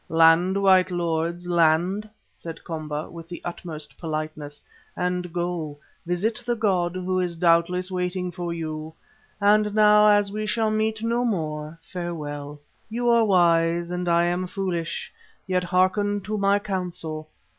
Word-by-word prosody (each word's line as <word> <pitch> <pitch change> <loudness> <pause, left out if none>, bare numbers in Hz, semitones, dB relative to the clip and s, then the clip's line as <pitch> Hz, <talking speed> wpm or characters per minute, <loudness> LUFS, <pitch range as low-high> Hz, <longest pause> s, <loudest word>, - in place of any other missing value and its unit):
"Land, 165 +4 +5
white 190 -2 +5
lords, 170 0 -2
land," 175 +5 +2 0.3
said 165 -1 -8
Komba 155 -2 -4
with 165 -1 -10
the 175 - -6
utmost 155 -4 -6
politeness, 155 -2 -5 0.3
"and 180 -1 -1
go, 170 -4 -3 0.3
visit 215 +7 -1
the 240 0 0
god 185 -6 +1
who 185 0 0
doubtless 170 +2 +3
is 185 - -7
waiting 180 0 -2
for 175 0 -4
you. 160 -1 -5 0.4
And 210 0 +3
now, 210 0 +6
as 205 -1 +3
we 215 +1 -3
shall 220 0 +1
meet 220 0 -1
no 235 +1 +1
more 155 -7 -2
farewell. 150 -5 -6 0.3
You 240 +2 0
are 235 -1 +5
wise 170 -2 +3
and 180 0 -2
I 170 0 +4
am 175 +1 0
foolish, 175 -3 -3 0.3
yet 185 -1 0
hearken 190 +3 +1
to 210 +3 -4
my 200 0 +3
counsel. 175 -6 -4
180 Hz, 145 wpm, -24 LUFS, 165-200 Hz, 0.4 s, now